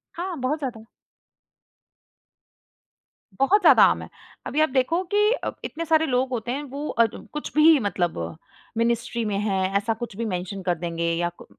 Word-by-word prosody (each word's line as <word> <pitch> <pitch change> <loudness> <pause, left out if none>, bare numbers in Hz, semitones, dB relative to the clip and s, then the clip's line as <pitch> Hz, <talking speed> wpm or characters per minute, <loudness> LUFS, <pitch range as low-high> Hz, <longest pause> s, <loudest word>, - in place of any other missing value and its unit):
हाँ, 355 +1 -4
बहुत 265 +4 -1
ज़्यादा। 235 -6 -6 2.5
बहुत 390 +10 +4
ज़्यादा - - +7
आम - - +4
है, - - -9 0.4
अभी 305 - 0
आप 310 - +3
देखो 275 +7 +1
कि 420 +1 +4
अ, - - -2
इतने 335 +1 -4
सारे 320 0 +3
लोग 255 -2 0
होते 240 -1 -3
हैं, 280 +3 -3
वो 285 +2 -6
अ, 230 - +3 0.3
कुछ 300 - -5
भी 310 +1 +7
मतलब 185 -6 -1 0.6
मिनिस्ट्री 235 +1 0
में 205 -2 -1
है, 200 -2 0 0.2
ऐसा 215 +3 0
कुछ 230 - -6
भी 230 - -2
मेंशन 190 -1 -4
कर 180 -1 +1
देंगे 170 0 -1
या 175 +1 0
कु - - -13
250 Hz, 170 wpm, -24 LUFS, 205-305 Hz, 2.5 s, ज़्यादा